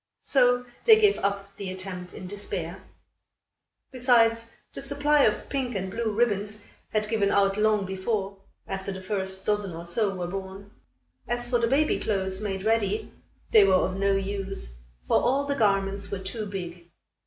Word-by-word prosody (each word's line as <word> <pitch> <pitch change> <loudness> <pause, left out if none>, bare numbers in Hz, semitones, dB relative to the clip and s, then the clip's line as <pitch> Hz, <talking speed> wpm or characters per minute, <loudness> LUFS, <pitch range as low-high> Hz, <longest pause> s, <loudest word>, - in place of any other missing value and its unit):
So 245 -2 +3 0.2
they 445 -2 +7
gave 415 -2 +4
up 200 0 -2
the 200 -3 -5
attempt 185 -1 -6
in - - -8
despair. 190 -2 -5 1.1
Besides, 230 -3 +3 0.2
the - - -6
supply 295 0 +2
of 210 - 0
pink 260 -4 -2
and 190 -1 -3
blue 230 0 -1
ribbons 210 -2 0 0.3
had 215 -1 0
given 210 -2 +1
out 195 -1 +3
long 210 -1 +2
before, 195 +1 -3 0.3
after 195 0 -4
the 190 -1 -7
first 190 -1 -1
dozen 205 -4 0
or 170 +1 -7
so 195 +3 +1
were 180 -1 -3
born. 195 +2 -7 0.6
As 240 +1 -1
for 240 -1 +1
the 230 - +2
baby 285 +5 +2
clothes 190 -2 -1
made 195 -2 -3
ready, 225 - 0 0.4
they 215 - +8
were 195 -1 +4
of 185 0 +1
no 195 0 +2
use, 195 - -3 0.3
for - - +2
all 275 +3 +1
the 280 - 0
garments 200 -5 +1
were 200 - -3
too 205 +3 -5
big. 175 -3 -7
200 Hz, 165 wpm, -26 LUFS, 190-230 Hz, 1.1 s, they